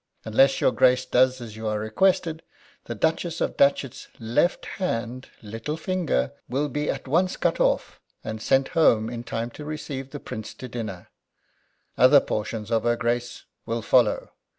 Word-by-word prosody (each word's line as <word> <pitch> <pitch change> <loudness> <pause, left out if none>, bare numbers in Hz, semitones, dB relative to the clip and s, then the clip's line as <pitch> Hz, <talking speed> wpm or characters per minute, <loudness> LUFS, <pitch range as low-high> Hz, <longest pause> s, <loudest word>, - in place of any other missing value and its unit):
Unless 135 +5 +4
your - - +4
Grace 130 0 +3
does 130 +1 +3
as 110 -3 -8
you 110 0 -5
are 105 0 0
requested 165 - +1 0.4
the 120 - -5
Duchess 165 - -1
of - - -1
Datchet's 140 -2 +1
left 115 +9 0
hand 125 -8 -4
little 115 +9 -5
finger 160 - -1 0.2
will 140 +4 -1
be 150 +2 -2
at - - -3
once 175 +7 +1
cut - - 0
off, - - 0 0.2
and 110 0 -5
sent 135 +3 +2
home 115 -8 +3
in 120 -1 -5
time 115 0 -4
to 150 - -9
receive 145 -3 -6
the 145 - -7
Prince 110 -4 -7
to 130 - -8
dinner. 110 -7 -6 0.9
Other - - +8
portions 105 0 -4
of 115 -1 +2
her 120 +1 +1
Grace 120 +1 -2 0.2
will 115 -1 -2
follow. 120 -2 +2
125 Hz, 165 wpm, -25 LUFS, 115-150 Hz, 0.9 s, Other